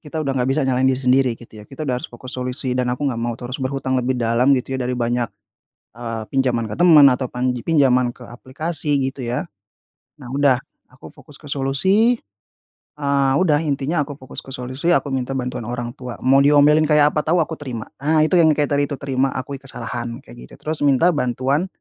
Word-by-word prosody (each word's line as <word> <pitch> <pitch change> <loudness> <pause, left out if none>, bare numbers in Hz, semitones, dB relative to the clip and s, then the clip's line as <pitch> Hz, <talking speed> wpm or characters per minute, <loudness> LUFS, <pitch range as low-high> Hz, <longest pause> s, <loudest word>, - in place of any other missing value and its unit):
kita 155 -1 -9
udah 140 -2 -1
nggak 125 0 0
bisa 145 +2 +1
nyalahin 130 0 +2
diri 130 0 -1
sendiri 130 0 +3
gitu 110 -2 -14
ya. - - -12
Kita 140 +3 -8
udah 125 -2 0
harus - - -7
fokus 125 +1 -10
solusi 125 +1 -3
dan 125 -1 0
aku 125 +4 -3
enggak 115 -2 -4
mau 120 0 -2
terus 125 +3 -6
berhutang 130 0 -1
lebih 125 +1 -1
dalam 120 +4 +3
gitu 130 +1 -3
ya - - -5
dari 125 - -2
banyak, 120 -1 -1 0.7
eee, 115 -1 -5
pinjaman 130 -4 +1
ke - - -3
teman 160 -5 +7
atau 130 +1 -2
pan 125 +1 -1
pinjaman 125 -1 +2
ke 125 - -12
aplikasi 145 +5 -2 0.2
gitu 130 - -7
ya, 120 +1 -2 0.8
nah 130 - -10
udah 140 -2 +3 0.3
aku 130 - -13
fokus 150 -2 -15
ke - - -16
solusi, 190 - +2 0.8
eee, 140 -2 +1
udah 160 -5 +3
intinya 145 +1 -1
aku 145 - -8
fokus 130 -3 -9
ke - - -15
solusi 130 +6 -3
aku 140 - -1
minta 130 0 -2
bantuan 125 -2 -4
orang 120 0 -4
tua, 125 -2 -7
mau 135 +2 +5
diomelin 150 +2 +5
kayak 150 -1 +4
apa - - +1
tahu 170 +3 +2
aku 160 - -7
terima. 125 -6 -5 0.2
Ah 155 +2 +2
itu 155 - -2
yang 160 -2 +6
kayak 145 -1 0
tadi 145 0 +2
itu 140 - -3
terima 135 0 0
akui 135 +1 -5
kesalahan 120 -1 -6
kayak 120 - -14
gitu, - - -17
terus 155 0 -3
minta 140 +6 +4
bantuan 135 +5 0
135 Hz, 210 wpm, -20 LUFS, 125-145 Hz, 0.8 s, teman